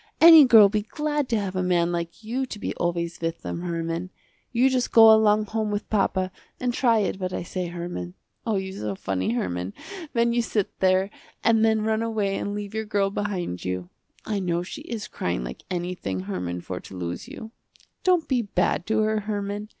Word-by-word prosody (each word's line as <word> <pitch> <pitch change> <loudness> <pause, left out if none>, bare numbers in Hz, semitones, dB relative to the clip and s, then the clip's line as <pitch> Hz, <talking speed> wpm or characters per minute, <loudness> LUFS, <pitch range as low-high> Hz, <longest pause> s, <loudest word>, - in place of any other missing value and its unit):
Any 325 -3 +10
girl 225 -5 +8
be 210 +1 0
glad 295 +5 -2
to 230 - +2
have 195 -2 -4
a 185 - 0
man 175 -1 +2
like 170 +4 -4
you 255 +4 -2
to 215 - -7
be - - -3
always 170 -1 -2
with 165 0 -3
them 170 - -4
Herman. 170 0 -3 0.4
You 245 +2 +4
just 255 -2 0
go 225 -1 +9
along 215 -1 +4
home 215 0 -2
with 205 0 -4
papa 190 -3 +1 0.3
and 250 -1 -1
try 235 -2 +3
it 195 -1 -2
what 185 -1 -2
I - - -3
say, 180 +1 -4
Herman. 170 - -6 0.3
Oh 225 -2 0
you 190 -1 -2
so 105 - -4
funny 95 +2 -2
Herman, 90 -4 -3 0.4
when 235 0 +2
you 240 - +2
sit 215 -3 -2
there, 190 +1 +3 0.3
and 225 -1 +4
then 220 -1 +3
run 220 0 +1
away 215 -4 -1
and 205 +1 -3
leave 205 0 -5
your 220 0 -2
girl 200 -2 0
behind 190 - -3
you. 90 -1 -4 0.3
I 210 -2 -1
know 175 -2 -1
she 185 - -8
is 230 -9 -5
crying 85 -9 -3
like - - -7
anything 175 - -3
Herman 90 -2 -4
for 90 +1 -5
to 95 - -11
lose 85 -1 -5
you. 220 - -9 0.5
Don't 360 -3 +3
be 255 -3 +2
bad 180 -4 0
to 220 0 +2
her 215 0 +1
Herman. 205 0 -4
200 Hz, 205 wpm, -25 LUFS, 170-220 Hz, 0.5 s, Any